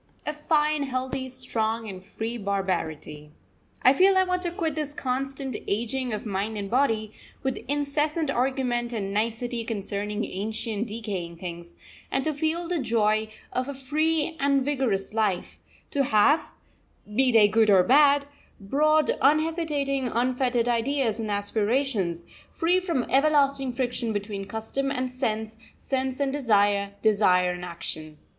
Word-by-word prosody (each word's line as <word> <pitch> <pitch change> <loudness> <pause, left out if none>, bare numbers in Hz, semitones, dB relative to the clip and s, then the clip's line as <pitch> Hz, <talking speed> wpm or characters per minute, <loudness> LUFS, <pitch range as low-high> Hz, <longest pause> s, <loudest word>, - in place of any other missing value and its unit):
A 300 - -1
fine, 300 0 +1
healthy, 260 0 -3
strong, 230 -3 -2
and 185 -2 -8
free 225 +4 -4
barbarity. 180 -8 -3 0.5
I 255 - +7
feel 380 +6 +5
I 375 - +6
want 365 -1 -1
to 350 - -1
quit 330 -3 -2
this 295 -1 -3
constant 270 0 -3
ageing 240 +4 -1
of 215 +1 -4
mind 210 +1 -2
and 200 -1 -4
body, 225 -5 +1 0.3
with 265 -1 -1
incessant 295 +2 0
argument 245 -2 0
and 200 -3 -3
nicety 230 +2 -1
concerning 210 -1 -3
ancient 220 +2 -3
decaying 205 -6 -5
things, 170 - -8 0.3
and 270 - 0
to 310 - +1
feel 320 +4 -1
the 350 -1 -1
joy 220 -3 +1 0.2
of 255 +2 -1
a 280 - -5
free 310 +4 0
and 275 -1 +2
vigorous 250 -10 0
life; 210 -5 -1 0.3
to 275 -1 +1
have, 250 +7 +3 0.7
be 260 +1 +4
they 220 -3 +6
good 220 +1 +3
or 190 -3 +6
bad, 280 +4 +5 0.3
broad, 305 +9 +2
unhesitating, 295 -2 +1
unfettered 245 0 0
ideas 240 -1 0
and 220 -1 -3
aspirations, 205 -3 0 0.3
free 350 +3 +2
from 335 -9 -1
everlasting 275 -1 +2
friction 245 -2 -2
between 205 -1 -4
custom 220 +6 -3
and 255 -1 -2
sense, 220 -3 -3 0.2
sense 260 0 -2
and 275 -1 0
desire, 205 -6 +2
desire 185 -4 +4
and 180 0 -6
action. 155 -3 -5
245 Hz, 140 wpm, -26 LUFS, 210-280 Hz, 0.7 s, I